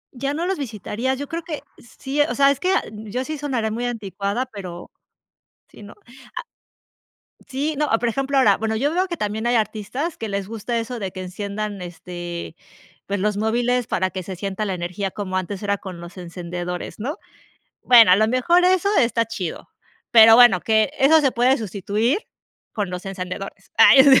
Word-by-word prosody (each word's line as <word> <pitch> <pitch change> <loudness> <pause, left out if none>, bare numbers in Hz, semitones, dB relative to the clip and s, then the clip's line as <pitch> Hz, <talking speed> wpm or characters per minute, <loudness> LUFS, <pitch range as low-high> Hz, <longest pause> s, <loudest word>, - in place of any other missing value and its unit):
¿Ya 275 +3 -2
no 335 - -2
los 375 -3 -1
visitarías? 240 +1 -3
Yo 285 - -5
creo 335 +3 -4
que 315 -3 -6 0.2
sí, 265 +5 -3
o 290 - +1
sea, 275 0 +5
es 280 - -2
que 370 - +1
ah, - - +2
yo 220 +4 -5
sí 310 +1 -4
sonaré 250 -7 -2
muy 240 +3 -3
anticuada, 205 0 -3
pero 185 -8 -9 0.8
si - - -15
no. 205 - -11 0.4
Ah - - -4 1.0
Sí, 285 +4 -2
no, 300 0 +1
ah 225 - +3
por 240 0 0
ejemplo, 275 +3 -1
ahora, 210 -7 +5
bueno, 220 0 -2
yo 285 +8 0
veo 370 +2 +1
que 345 -3 -5
también 215 +1 -2
hay 240 - +2
artistas 230 - -2
que 225 -2 -5
les 200 -1 -3
gusta 230 +2 -3
eso 235 +1 -5
de 190 -2 -4
que 185 - -7
enciendan, 200 +2 -5
este, 175 -1 -7 0.5
pues 200 0 -2
los 210 +1 0
móviles 240 +3 0
para 185 0 0
que 185 -1 -5
se 190 +1 -6
sienta 195 +3 -3
la 195 - -2
energía 180 +2 -4
como 185 -2 -5
antes 190 +2 -4
era 200 0 0
con 185 -3 -9
los 175 +2 -11
encendedores, 175 +1 -6
¿no? 290 - -4 0.7
Bueno, 235 -6 +7
a - - +7
lo 220 +1 +3
mejor 340 +9 +3
eso 370 +1 +3
está 230 -1 +2
chido, 185 -7 -5 0.4
pero 225 -1 +9
bueno, 240 -7 +7
que 220 +2 +2
eso 310 +4 +6
se 270 -4 +2
puede 250 +3 +3
sustituir 215 - -1 0.5
con 205 -4 -3
los 180 +1 -6
encendedores. 195 +1 -7
¡Ay 265 0 +8
sí! 270 -2 +7
220 Hz, 195 wpm, -22 LUFS, 195-265 Hz, 1.0 s, pero